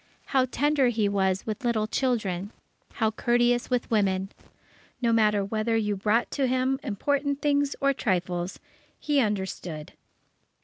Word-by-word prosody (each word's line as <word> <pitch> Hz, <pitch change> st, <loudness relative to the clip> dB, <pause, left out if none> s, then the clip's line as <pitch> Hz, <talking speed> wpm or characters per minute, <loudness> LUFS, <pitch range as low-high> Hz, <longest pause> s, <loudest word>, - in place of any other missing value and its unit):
How 260 Hz, -1 st, +4 dB
tender 290 Hz, -1 st, +2 dB
he 225 Hz, -4 st, +1 dB
was 190 Hz, -1 st, 0 dB
with 215 Hz, +2 st, -4 dB
little 230 Hz, -3 st, +1 dB
children! 215 Hz, -6 st, -1 dB, 0.4 s
How 220 Hz, -2 st, +1 dB
courteous 240 Hz, +2 st, +1 dB
with 250 Hz, -2 st, -1 dB
women! 195 Hz, -3 st, +1 dB, 0.7 s
No 235 Hz, -2 st, +2 dB
matter 210 Hz, -3 st, +3 dB
whether 220 Hz, +2 st, 0 dB
you 210 Hz, -2 st, 0 dB
brought 215 Hz, +4 st, +1 dB
to 275 Hz, -2 st, 0 dB
him 260 Hz, +1 st, +1 dB
important 280 Hz, +6 st, -1 dB
things 285 Hz, -1 st, +1 dB
or 275 Hz, -1 st, +3 dB
trifles, 180 Hz, -6 st, -2 dB, 0.4 s
he 295 Hz, -2 st, +1 dB
understood. 190 Hz, -, -3 dB
225 Hz, 135 wpm, -26 LUFS, 200-260 Hz, 0.7 s, How